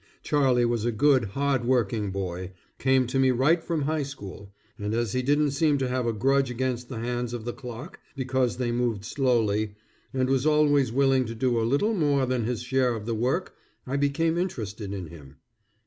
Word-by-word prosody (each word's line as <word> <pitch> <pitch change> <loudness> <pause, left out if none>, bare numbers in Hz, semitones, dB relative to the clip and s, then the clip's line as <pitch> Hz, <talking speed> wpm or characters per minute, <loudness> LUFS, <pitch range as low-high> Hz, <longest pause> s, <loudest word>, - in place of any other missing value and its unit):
Charlie 130 -4 +3
was 120 -2 0
a 120 - +1
good, 130 +1 +3
hard 135 +5 0
working 115 -4 +1
boy, 95 -1 -4 0.3
came 130 -1 +3
to 125 +2 -1
me 130 0 +4
right 145 +7 +3
from 165 -4 -1
high 155 +2 0
school, 105 -8 -8 0.3
and 105 +1 -2
as 115 -3 0
he 125 - +1
didn't 145 +2 +2
seem 150 0 +2
to 135 -2 -1
have 125 -1 -1
a - - +2
grudge 135 +4 +2
against 125 0 -2
the 125 - -5
hands 120 +1 -3
of 115 -2 -7
the 120 - -3
clock 125 +5 -9 0.2
because 130 -2 0
they 125 -2 -1
moved 120 -4 -1
slowly, 110 -5 +1 0.4
and 130 -1 0
was 135 -1 +1
always 145 -4 +3
willing 135 0 +3
to 115 0 -6
do 120 0 +1
a 115 0 0
little 205 - +2
more 145 -8 +2
than 125 -3 -1
his 120 0 -2
share 130 -1 +1
of 105 -2 -6
the 115 - -2
work, 125 +11 -1 0.3
I 130 - -3
became 150 +4 +1
interested 110 - -4
in 95 -3 -4
him. 75 -4 -13
125 Hz, 200 wpm, -26 LUFS, 115-140 Hz, 0.4 s, me